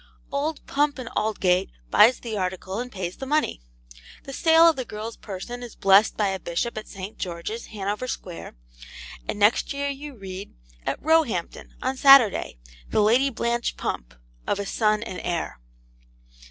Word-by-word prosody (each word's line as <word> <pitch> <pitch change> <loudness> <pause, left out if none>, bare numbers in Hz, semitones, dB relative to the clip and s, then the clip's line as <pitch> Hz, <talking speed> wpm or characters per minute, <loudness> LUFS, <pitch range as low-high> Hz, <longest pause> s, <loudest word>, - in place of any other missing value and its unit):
Old 290 +3 -2
Pump 285 -1 +1
and 250 -3 -6
Aldgate 195 -3 +1 0.2
buys 225 +4 +6
the 230 -3 -5
article 190 +1 -3
and 250 +1 -5
pays 185 -2 -5
the 270 - -6
money. 300 - 0 0.6
The 275 - -8
sale 325 +3 +6
of 330 - +5
the 260 - -3
girl's 220 0 -7
person 225 +5 -7
is 240 -3 -9
blessed 195 +2 +5
by 210 -2 +2
a 190 0 -2
Bishop 175 +8 -2
at 215 - -6
St. 195 +2 -8
George's, 180 +6 -5
Hanover 210 +3 -3
Square, 180 - -6 0.7
and - - -3
next 210 +7 +3
year 280 0 -2
you 280 0 -7
read, 195 -2 -8 0.3
'At - - 0
Roehampton, 305 - +1
on 260 +1 -1
Saturday, 255 - +6 0.3
the - - +1
Lady 240 +6 +4
Blanche 235 -1 -1
Pump, - - -4 0.3
of - - +1
a 200 - -3
son 215 +1 +1
and 185 -5 -6
heir. 170 - -3
220 Hz, 165 wpm, -25 LUFS, 190-265 Hz, 0.7 s, buys